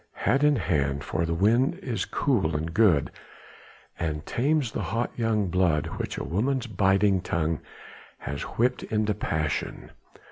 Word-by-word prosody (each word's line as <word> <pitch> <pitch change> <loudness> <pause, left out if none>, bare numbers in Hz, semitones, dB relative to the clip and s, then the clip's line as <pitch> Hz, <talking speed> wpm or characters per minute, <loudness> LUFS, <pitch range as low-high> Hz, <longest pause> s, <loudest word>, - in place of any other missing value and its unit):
Hat 135 +3 +1
in 150 0 +5
hand, 70 - 0
for 80 +3 -1
the 85 - -1
wind 115 +9 +3
is 115 -7 -3
cool 100 - 0
and 80 +2 -3
good, 95 -9 +3 0.9
and 75 -2 -2
tames 135 0 +1
the - - -3
hot 115 +6 -2
young 110 -4 +1
blood 85 -4 +2
which - - -3
a - - -3
woman's 125 +8 0
biting 95 -2 +2
tongue 80 -3 -1 0.6
has 70 -1 -5
whipped 125 +2 0
into 110 -1 0
passion. 80 -7 -3
100 Hz, 145 wpm, -26 LUFS, 80-115 Hz, 0.9 s, in